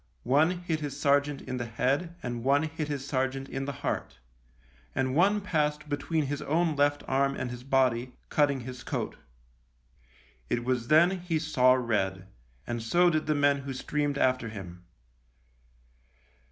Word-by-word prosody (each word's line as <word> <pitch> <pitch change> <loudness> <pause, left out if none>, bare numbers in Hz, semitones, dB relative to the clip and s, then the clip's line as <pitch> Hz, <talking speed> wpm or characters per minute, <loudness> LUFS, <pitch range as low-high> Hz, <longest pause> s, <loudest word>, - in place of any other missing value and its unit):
One 150 +6 +4
hit 160 -3 -1
his 145 -2 -5
sergeant 145 0 +2
in 130 -1 -4
the 120 - -3
head 140 +9 -1
and 120 -1 -4
one 140 +3 +3
hit 155 -1 -3
his 140 -2 -4
sergeant 135 0 -1
in 135 0 -4
the 140 - -2
heart, - - -2 0.8
and 130 -1 0
one 200 +5 +4
passed 150 -5 -1
between 155 +1 -1
his 145 +1 -3
own 160 +1 +1
left 145 0 +2
arm 135 +1 +1
and 125 -2 -4
his 125 0 -8
body, 130 -2 +1 0.2
cutting 140 -3 +2
his 125 0 -8
coat. - - -3 1.3
It 120 - 0
was 125 -2 0
then 160 +4 +6
he 175 -3 -2
saw 130 -5 +4
red, 95 -6 -1 0.4
and 120 -1 -3
so 175 +10 +3
did 155 -1 -1
the 155 - +2
men 140 -1 +3
who 135 0 -5
streamed 145 +1 -1
after 130 -4 +1
him. 90 -4 -9
140 Hz, 160 wpm, -28 LUFS, 125-150 Hz, 1.3 s, then